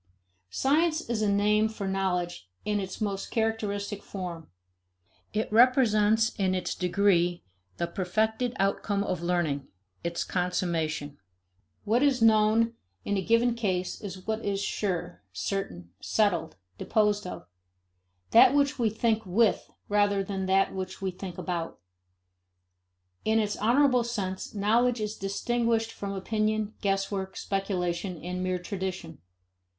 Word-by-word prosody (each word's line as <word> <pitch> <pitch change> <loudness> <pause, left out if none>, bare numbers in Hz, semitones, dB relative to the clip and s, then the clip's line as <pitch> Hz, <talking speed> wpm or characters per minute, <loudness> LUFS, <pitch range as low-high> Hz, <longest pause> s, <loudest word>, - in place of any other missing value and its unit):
Science 310 - +2
is 220 -2 0
a 210 -1 +2
name 210 +2 +3
for 215 -3 -5
knowledge 180 - -2 0.2
in 210 -1 0
its 190 -1 -5
most 200 -2 -2
characteristic 210 -2 -1
form. 175 -6 -7 0.8
It 215 +1 -1
represents 225 -3 +4
in 190 -1 +2
its 185 - -2
degree, 175 -1 +2 0.3
the - - 0
perfected 220 +7 -1
outcome 200 +1 0
of 180 -4 -2
learning, 170 -6 0 0.4
its 170 0 -2
consummation. 170 -5 -2 0.7
What 230 +4 +2
is 280 -3 +3
known, 225 +1 +4 0.3
in 205 - 0
a 195 - +1
given 230 +4 +3
case, 185 -6 -2
is 190 -2 -7
what 220 +1 -2
is 200 -1 -1
sure, 195 -3 -2
certain, 90 - -4
settled, 175 -7 +1 0.2
disposed 210 -3 +1
of; 180 - -7 0.9
that - - +7
which 280 -2 +2
we 230 -2 +3
think 220 +1 0
with 210 +2 +2 0.2
rather 205 -1 +2
than 190 -1 -3
that 195 +1 +3
which 190 0 -5
we 190 - 0
think 180 -1 -8
about. 170 -3 -3 1.5
In 220 +1 +2
its 210 -2 +1
honorable 250 +2 +3
sense, 200 -5 -4
knowledge 230 +4 +2
is 215 0 -3
distinguished 225 +3 0
from 200 -1 -5
opinion, 215 +2 -1
guesswork, 195 -1 -1
speculation, 185 -2 -2
and 180 +1 -3
mere 185 0 0
tradition. 180 -3 -5
200 Hz, 130 wpm, -28 LUFS, 185-220 Hz, 1.5 s, that